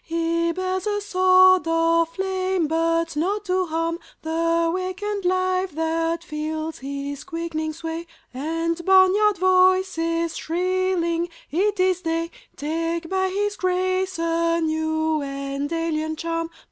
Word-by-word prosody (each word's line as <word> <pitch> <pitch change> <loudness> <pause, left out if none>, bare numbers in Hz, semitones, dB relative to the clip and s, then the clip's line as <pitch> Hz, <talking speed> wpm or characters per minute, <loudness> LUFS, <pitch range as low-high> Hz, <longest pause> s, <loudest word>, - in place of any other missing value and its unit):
He 335 0 0
bears 370 +2 -2
a 415 0 0
sword 370 -2 +5
of 330 0 +2
flame 375 -1 -1
but 330 +1 0
not 390 +7 -1
to 370 -1 0
harm 330 +1 -1 0.2
The 330 +1 +1
wakened 375 +2 -3
life 370 0 +1
that 330 +1 -1
feels 310 0 -4
his 280 +1 -5
quickening 330 -2 -3
sway 330 +1 -6 0.3
And 330 +5 -2
barnyard 385 +3 +5
voices 370 -3 +2
shrilling 350 -1 0 0.2
"It 400 +5 +1
is 370 -1 +2
day!" 330 0 -2 0.2
Take 330 +3 -3
by 380 0 +1
his 410 +2 -1
grace 370 0 0
a 335 0 +1
new 315 -1 0
and 275 +1 -4
alien 315 -1 -1
charm. 330 +1 -3
335 Hz, 120 wpm, -23 LUFS, 325-370 Hz, 0.3 s, sword